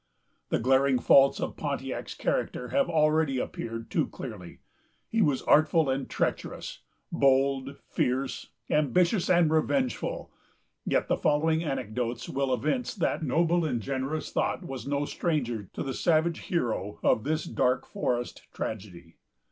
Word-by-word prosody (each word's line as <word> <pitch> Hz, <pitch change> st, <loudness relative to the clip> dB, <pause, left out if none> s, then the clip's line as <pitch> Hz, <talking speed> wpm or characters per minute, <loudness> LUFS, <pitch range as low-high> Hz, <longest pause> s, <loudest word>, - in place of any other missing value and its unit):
The -, -, +2 dB
glaring 130 Hz, +2 st, +3 dB
faults 135 Hz, +2 st, +5 dB
of -, -, -3 dB
Pontiac's -, -, -4 dB
character -, -, -2 dB
have 280 Hz, -1 st, +1 dB
already 155 Hz, -3 st, +2 dB
appeared 115 Hz, -2 st, -5 dB
too -, -, +1 dB
clearly. 105 Hz, -9 st, -9 dB, 0.5 s
He 225 Hz, -, 0 dB
was 145 Hz, -8 st, +2 dB
artful 155 Hz, -1 st, +4 dB
and 135 Hz, 0 st, -2 dB
treacherous, -, -, -3 dB, 0.3 s
bold, 135 Hz, 0 st, +2 dB
fierce, 130 Hz, +2 st, -1 dB, 0.2 s
ambitious, 170 Hz, -, +2 dB
and 170 Hz, -3 st, +4 dB
revengeful; 260 Hz, -, 0 dB, 0.6 s
yet -, -, +1 dB
the -, -, +1 dB
following 160 Hz, +2 st, +2 dB
anecdotes 125 Hz, -4 st, -3 dB
will 135 Hz, -1 st, -1 dB
evince 150 Hz, -, -1 dB
that 180 Hz, -, 0 dB
noble 165 Hz, +4 st, +2 dB
and 130 Hz, -7 st, 0 dB
generous 135 Hz, +6 st, -3 dB
thought -, -, -1 dB
was 135 Hz, -1 st, -6 dB
no 145 Hz, 0 st, 0 dB
stranger 120 Hz, -, -2 dB
to -, -, -4 dB
the 135 Hz, -, -3 dB
savage 165 Hz, +2 st, +2 dB
hero 110 Hz, -, -2 dB
of 110 Hz, -, +3 dB
this 155 Hz, +3 st, -1 dB
dark 125 Hz, 0 st, 0 dB
forest 120 Hz, -, -3 dB
tragedy. 90 Hz, -6 st, -7 dB
140 Hz, 135 wpm, -28 LUFS, 125-160 Hz, 0.6 s, faults